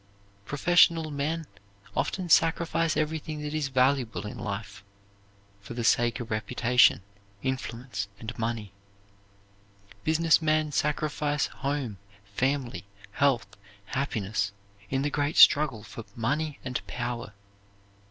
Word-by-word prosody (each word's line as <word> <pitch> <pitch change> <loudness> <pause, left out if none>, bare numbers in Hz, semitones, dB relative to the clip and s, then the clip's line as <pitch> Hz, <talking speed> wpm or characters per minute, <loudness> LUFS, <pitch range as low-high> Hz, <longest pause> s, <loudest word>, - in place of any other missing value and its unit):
Professional 165 - +4
men 155 +3 -2 0.5
often 185 -2 -1
sacrifice 165 -1 +3
everything 155 0 -2
that 150 0 -4
is 155 -2 0
valuable 130 -4 +1
in 105 - -6
life 105 0 -5 0.8
for 100 +4 -9
the 120 - -2
sake 120 +2 +3
of 120 -2 -6
reputation, 120 0 +3 0.4
influence, 125 -5 -3
and 115 +1 -6
money. 115 -3 -3 1.3
Business 160 +1 +3
men 155 -1 +1
sacrifice 150 0 0
home, 135 -8 -3 0.3
family, 130 +4 -2 0.3
health, 135 +1 +2 0.4
happiness, 105 -5 -2 0.4
in 135 0 0
the 145 - -1
great 145 +2 -1
struggle 140 -8 +6
for 115 +1 -9
money 145 +6 -1
and 125 -1 -2
power. 120 -3 -4
135 Hz, 110 wpm, -28 LUFS, 115-150 Hz, 1.3 s, struggle